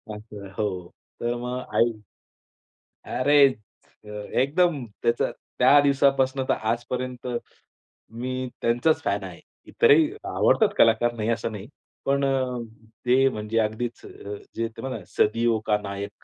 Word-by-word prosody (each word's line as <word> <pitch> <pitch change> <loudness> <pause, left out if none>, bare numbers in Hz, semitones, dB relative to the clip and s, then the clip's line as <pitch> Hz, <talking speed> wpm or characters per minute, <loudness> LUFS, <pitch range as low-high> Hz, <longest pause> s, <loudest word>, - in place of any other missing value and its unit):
असं 105 -2 -10
हो. 95 -5 -2 0.3
तर 120 0 0
मग 125 +1 -4 0.2
आई 115 +2 +4 1.3
अरे, 145 +2 +5 1.0
एकदम 150 -1 +1 0.2
त्याचा 115 - +1 0.3
त्या 145 - +7
दिवसापासून 135 -1 +2
तर - - +5
आजपर्यंत, 125 +2 -3 0.8
मी 130 +2 -4
त्यांचाच 120 +7 +2
फॅन - - -1
आहे. - - -9 0.3
इतरही 425 -10 +5 0.2
आवडतात 220 - +3
कलाकार 115 +1 +4
नाही 110 0 -2
असं 115 0 -1
नाही. 105 +1 -8 0.4
पण 140 0 +2
अ, 130 -2 0 0.5
ते 130 +2 +4
म्हणजे 110 -1 -2
अगदीच 110 +2 -2 0.5
जे 115 0 -1
ते 115 - -11
म्हणातात 130 -4 -4
ना 90 - -15 0.2
सदियो 115 +1 +1
का 105 -1 +3
नायक 100 0 -7
120 Hz, 125 wpm, -25 LUFS, 110-135 Hz, 1.3 s, त्या